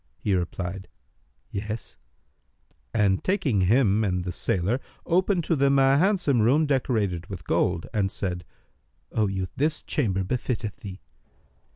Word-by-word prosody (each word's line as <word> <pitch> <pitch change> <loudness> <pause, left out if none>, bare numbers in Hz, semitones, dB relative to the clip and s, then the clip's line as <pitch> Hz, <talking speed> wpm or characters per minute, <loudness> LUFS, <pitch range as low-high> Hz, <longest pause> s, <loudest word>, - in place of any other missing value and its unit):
He 100 - -1
replied, 90 +1 -3 0.6
'Yes," 105 +3 -5 1.0
and 100 -4 +2
taking 145 - +1
him 110 +1 +3
and 90 -3 0
the 90 - -3
sailor, 95 +7 0 0.3
opened 185 +1 +2
to 165 - +1
them 140 -1 +3
a 135 +1 +5
handsome 175 - +2
room 140 +8 +4
decorated 110 - 0
with 95 -3 -8
gold, 85 -2 +1
and 100 -3 +1
said, 90 -2 -3 0.7
"O 110 -2 +1
youth, 95 -1 -3
this 150 +2 0
chamber 95 -9 0
befitteth 110 0 -2
thee." 95 -2 -9
105 Hz, 135 wpm, -26 LUFS, 95-135 Hz, 1.0 s, a